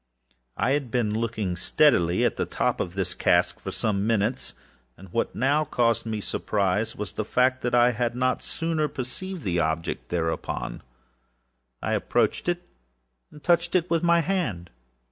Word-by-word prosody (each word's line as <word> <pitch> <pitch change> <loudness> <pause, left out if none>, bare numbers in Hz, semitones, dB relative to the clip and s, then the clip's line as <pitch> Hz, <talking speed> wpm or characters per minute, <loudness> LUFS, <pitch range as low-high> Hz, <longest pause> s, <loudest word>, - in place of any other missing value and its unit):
I 130 - +1
had 140 -3 0
been 115 -4 0
looking 110 -5 -1
steadily 90 - +3
at - - +1
the - - -2
top - - 0
of 85 - -3
this 95 -2 -1
hogshead - - +2
for - - -5
some 105 -1 -1
minutes, 115 +2 0 0.4
and 95 0 -13
what 115 - -1
now 140 +5 +2
caused 115 -5 +1
me 110 -1 -2
surprise 105 +2 -1
was 105 -2 -5
the 110 - -3
fact 130 +4 +2
that 120 0 0
I 120 0 +5
had 120 0 -1
not 130 0 +1
sooner 165 -2 -1
perceived 165 +8 -6
the 90 -3 0
object 80 0 -2
thereupon. 80 -2 -2 1.0
I - - 0
approached - - +1
it, 175 0 -2 0.6
and 150 - -14
touched 175 0 +2
it 180 -1 +1
with 165 -1 +3
my 170 -1 +4
hand. 140 - -2
120 Hz, 165 wpm, -26 LUFS, 100-150 Hz, 1.0 s, I